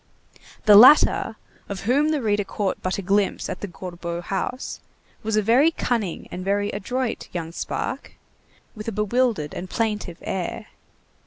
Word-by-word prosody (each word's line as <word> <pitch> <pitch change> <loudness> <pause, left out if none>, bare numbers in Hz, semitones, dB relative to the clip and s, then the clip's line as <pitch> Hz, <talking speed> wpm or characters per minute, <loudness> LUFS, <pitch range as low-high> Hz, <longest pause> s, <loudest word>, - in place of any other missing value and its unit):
The 210 -1 +8
latter, 235 -1 +7 0.3
of 200 -2 -5
whom 280 +8 +2
the 300 -4 0
reader 205 -1 +1
caught 195 0 -3
but 185 - -1
a 200 - -4
glimpse 200 +2 0
at - - -5
the 205 - -3
Gorbeau 175 -2 -6
house, 195 +8 -4 0.4
was 220 0 -1
a 215 - +2
very 250 +9 +5
cunning 230 - -2
and 180 - -5
very 205 +1 0
adroit 250 +3 -3
young 165 -2 -4
spark, - - -4 0.6
with 215 0 -8
a - - -1
bewildered 210 -5 0
and 185 - -6
plaintive 210 -6 -2
air. 185 -3 -4
205 Hz, 155 wpm, -23 LUFS, 185-230 Hz, 0.6 s, The